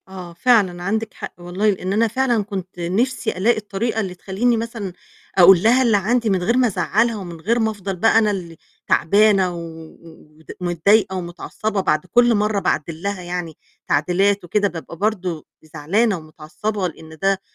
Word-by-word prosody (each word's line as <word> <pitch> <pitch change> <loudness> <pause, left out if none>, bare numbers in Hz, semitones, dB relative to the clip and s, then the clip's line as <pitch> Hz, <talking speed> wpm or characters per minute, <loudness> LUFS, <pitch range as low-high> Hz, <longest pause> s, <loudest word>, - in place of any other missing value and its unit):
آه 185 -2 -9
فعلًا، 185 -3 +2
عندِك 220 +3 -2
حق - - -8
والله 180 +4 -1
لأن 190 -1 -2
أنا 225 +3 +3
فعلًا 240 -1 0
كنت 190 -3 -7
نِفسي 220 +6 -1
ألاقي 225 +5 +2
الطريقة 215 +2 -3
اللي 190 -4 -3
تخلّيني 210 +6 0
مثلًا 225 -5 -5 0.4
أقول 185 0 +7
لها 245 +4 +4
اللي 225 -4 +3
عندي 230 +3 +1
من 185 -3 0
غير 235 +7 +1
ما 255 -1 +4
أزعلها، 225 +2 +1
ومن 175 -4 -8
غير 230 +7 +1
ما 220 -1 +1
أفضل 195 -2 -5
بقى 225 +5 +3
أنا 215 -2 +3
اللي 170 -5 -6 0.3
تعبانة 195 0 +3
و - - -6
و 160 -1 -12
ود 160 - -12
متضايقة 190 +3 +2
ومتعصبة 185 +4 -4
بعد 155 -2 0
كُل 240 +5 +3
مرّة 210 0 +1
باعدِّل 160 -3 -2
لها 200 -1 -3
يعني 175 -2 -5 0.3
تعديلات 195 +6 +1
وكده، 205 +4 +1
بابقى 170 -2 -8
برضو 185 -6 -2 0.2
زعلانة 175 +8 0
ومتعصبة 170 +6 -4
لأن 160 -1 -12
ده 195 0 +1
195 Hz, 170 wpm, -20 LUFS, 175-220 Hz, 0.4 s, أقول